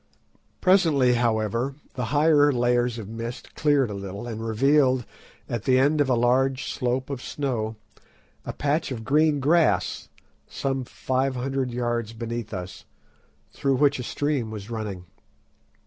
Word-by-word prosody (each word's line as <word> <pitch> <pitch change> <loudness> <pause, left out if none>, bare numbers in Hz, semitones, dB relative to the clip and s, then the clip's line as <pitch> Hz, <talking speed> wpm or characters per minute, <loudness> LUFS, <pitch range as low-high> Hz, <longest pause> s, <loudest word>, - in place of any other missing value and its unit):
Presently, 160 -10 +4
however, 115 +2 0 0.2
the 125 - -3
higher 145 +2 +4
layers 120 -1 +1
of 110 -4 -7
mist 115 +3 -7
cleared 145 -6 +2
a - - -4
little, 100 +2 -6
and 115 -2 -5
revealed, 130 +2 +3 0.4
at 115 -2 -4
the 130 -1 +4
end 145 +3 +3
of 140 - +1
a 125 - +4
long 130 +3 +2
slope 130 +1 -2
of 135 -3 -4
snow, 120 -7 -3 0.7
a - - -4
patch 150 +1 -1
of 115 -3 -5
green 150 +3 +3
grass, 160 +4 +2 0.4
some 135 -1 -2
five 130 +2 -1
hundred 135 +1 -2
yards 120 -2 -2
beneath 115 -1 -5
us, 90 -2 -7 0.7
through 135 -2 +1
which 140 0 +3
a - - -3
stream 140 -3 -1
was 110 0 -8
running. 105 -5 -5
125 Hz, 145 wpm, -25 LUFS, 115-140 Hz, 0.7 s, Presently